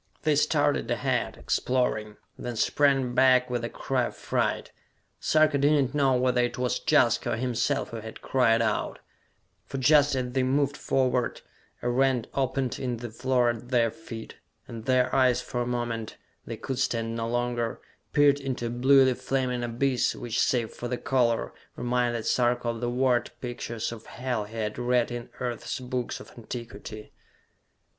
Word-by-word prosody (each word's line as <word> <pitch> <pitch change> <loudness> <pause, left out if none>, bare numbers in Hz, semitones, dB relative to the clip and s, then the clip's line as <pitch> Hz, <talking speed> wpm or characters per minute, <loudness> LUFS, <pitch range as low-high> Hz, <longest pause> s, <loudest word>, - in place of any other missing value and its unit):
They - - +3
started - - +2
ahead, - - -1
exploring, 110 -4 -1 0.2
then 120 -1 -5
sprang 135 +1 +2
back 125 -1 +4
with 120 -1 -1
a 120 - -2
cry 130 -2 -1
of - - -6
fright. - - -1 0.5
Sarka 155 -2 +3
did 145 +2 +4
not 135 -1 0
know 135 -3 +3
whether 125 0 +2
it 120 - -1
was 125 -1 0
Jaska 120 -2 +3
or - - +1
himself 125 0 -1
who 115 - -5
had 110 0 -8
cried 115 -3 +2
out; 110 -2 -1 0.7
for 135 - -5
just 145 +1 +4
as 125 -1 -2
they 130 - +1
moved 140 +2 +1
forward, 130 -3 0 0.4
a - - +1
rent 130 -2 +2
opened 135 -2 -1
in 125 -2 -2
the 120 0 -7
floor 125 0 +2
at 120 +1 -9
their 120 -3 +3
feet, 115 -7 -9 0.3
and 115 -1 -8
their 130 -1 +2
eyes 125 -2 +4
for 125 0 -3
a 120 - -2
moment 120 -2 -3 0.3
they - - -5
could 130 -2 -4
stand 115 -3 -1
no 115 0 -2
longer 120 -1 -1 0.3
peered 145 -1 +4
into 130 -3 -3
a - - -1
bluely 130 +2 +5
flaming 130 -1 -1
abyss 120 +2 0
which, 120 -1 -3
save 120 -3 +1
for 120 - -5
the 125 0 -2
color, 120 -3 +1 0.2
reminded 120 -1 0
Sarka 120 -1 +1
of 115 0 -4
the 120 - 0
word 125 -1 +1
pictures 120 -2 -4
of 115 -1 -10
Hell 125 -4 -3
he 110 +2 -12
had 110 0 -3
read 120 0 +1
in 120 -1 -6
Earth's 125 +2 -3
books 125 -1 -3
of - - -12
antiquity! 115 -2 -8
125 Hz, 170 wpm, -27 LUFS, 120-130 Hz, 0.7 s, bluely